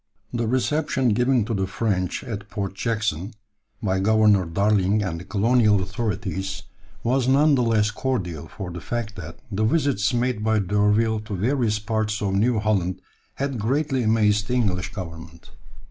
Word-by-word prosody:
] - - -35
The 120 -1 -1
reception 130 +2 +1
given 125 +1 +2
to 115 - -3
the 95 -2 -1
French 95 -3 -1
at 105 -5 -6
Port 100 -2 -3
Jackson, 105 -2 -2 0.5
by 95 -2 +1
Governor 105 -1 +4
Darling 100 +3 +2
and 85 -4 -3
the - - -8
colonial 105 +2 +3
authorities, 95 -1 -3 0.4
was 125 +1 +1
none 145 +3 +4
the 130 - +3
less 110 -3 +2
cordial 90 - -3
for 95 +2 -7
the 85 0 -7
fact 120 -3 -4
that 85 -2 -8
the 105 +2 0
visits 130 -3 +2
made 120 -3 0
by 110 0 +2
D'Urville 105 +3 +2
to 105 - -4
various 115 +2 +1
parts 110 0 -1
of 100 -2 -1
New 110 +4 +2
Holland 95 -4 0 0.4
had 140 -3 -2
greatly 135 +4 0
amazed 105 -2 +2
the 125 - -1
English 100 -4 0
Government. 85 -5 -9
105 Hz, 160 wpm, -23 LUFS, 95-120 Hz, 0.5 s, Governor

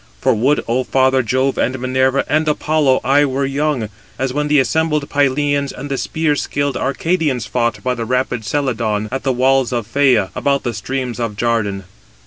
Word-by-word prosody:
For - - +2
would, 130 +7 +1
Ο 125 +3 +1
father 130 0 +2
Jove, 130 +3 0
and 130 +2 0
Minerva, 130 +2 +1
and 155 +1 +1
Apollo, 150 -2 +2
I 140 +3 +4
were 135 0 0
young, 135 -5 -1 0.3
as 130 0 -2
when 150 +1 -1
the 150 0 +3
assembled 150 +1 0
Pylians 145 0 +1
and 140 +2 -8
the 135 - -1
spear 160 -2 0
skilled 145 -1 -2
Arcadians 140 -3 -1
fought 120 0 -1
by 125 0 0
the 115 -2 -4
rapid 125 -1 -1
Celadon, 110 -5 -1
at 135 - -2
the 135 - 0
walls 130 0 +2
of 120 -3 -2
Phæa, 125 -4 +2
about 140 -1 0
the 120 - -2
streams 125 +3 -4
of 115 -3 -3
Jardan. 105 -4 -1
130 Hz, 180 wpm, -18 LUFS, 120-145 Hz, 0.3 s, I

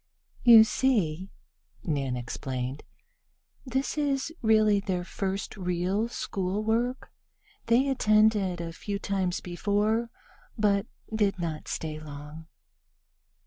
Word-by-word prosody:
"You 230 -3 +10
see," 195 -8 0 0.5
Nan 140 -8 -1
explained, 130 +2 -4 0.9
"this 265 +4 -1
is 285 +1 0
really 215 -2 +4
their 185 -3 -2
first 195 +2 -4
real 185 +3 -1
school 195 -2 -3
work. 235 +4 -1 0.6
They 240 +4 +4
attended 215 -7 +3
a 165 -1 -5
few 200 +4 -4
times 190 -3 -1
before, 210 +6 0 0.5
but 205 -1 +2 0.3
did 205 -2 +1
not 165 -3 -4
stay 155 -1 -4
long." 150 +1 -10
200 Hz, 105 wpm, -28 LUFS, 170-220 Hz, 0.9 s, You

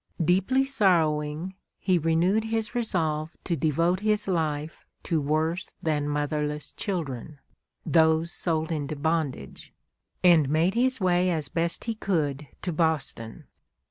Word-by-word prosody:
Deeply 195 - +3
sorrowing, 165 - +1 0.2
he 185 -3 +1
renewed 170 +7 +2
his 225 0 -2
resolve 165 -9 -1
to 170 - -1
devote 165 +3 +1
his 210 0 +1
life 155 -4 -2 0.2
to 160 -3 0
worse 155 +5 -1
than 150 -2 0
motherless 150 0 -2
children, 155 - -4 0.5
those 160 0 +3
sold 160 -2 -1
into 150 -1 -2
bondage, 150 - -2 0.5
and 165 -6 +6
made 160 +5 +2
his 255 +2 +2
way 180 -1 +2
as 160 -4 -2
best 170 0 -1
he 230 - -2
could 150 -9 -1 0.2
to 180 - -2
Boston. 155 -8 -1
165 Hz, 125 wpm, -26 LUFS, 150-185 Hz, 0.5 s, and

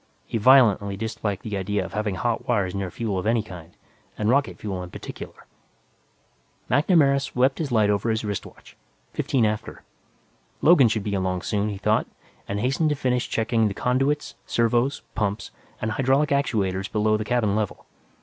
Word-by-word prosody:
He 115 - -2
violently 105 -5 +5
disliked 110 -2 -3
the 105 -3 -4
idea 100 0 -1
of - - -9
having 105 -2 -1
hot 120 +4 -2
wires 100 -7 +1
near 100 -2 -3
fuel 100 0 -3
of 90 - -3
any 115 -1 +2
kind, 90 -4 -12 0.4
and 105 0 0
rocket 140 +2 +1
fuel 95 -3 -4
in 90 - -7
particular. - - -9 1.3
MacNamara 145 -3 +4
swept 130 +1 +1
his 150 -5 -2
light 105 -3 +3
over 100 +3 0
his 110 -1 -1
wrist 100 -2 -3
watch. - - -17 0.4
Fifteen 125 -5 +1
after. 105 0 -3 0.8
Logan 150 -6 +6
should 110 -2 -1
be 100 - -3
along 95 -2 -1
soon, 105 0 -1
he 100 - -4
thought, 105 +2 +1 0.4
and 100 - -2
hastened 135 +7 +1
to 150 - +1
finish 125 -3 -1
checking 115 0 +1
the 100 - -4
conduits, 135 +5 0
servos, 120 +4 +1
pumps 105 -1 -2 0.3
and 110 - -2
hydraulic 135 +5 +2
actuators 105 -9 0
below 110 0 +2
the 110 - -1
cabin 110 -3 +1
level. 105 -3 -3
110 Hz, 170 wpm, -24 LUFS, 100-125 Hz, 1.3 s, Logan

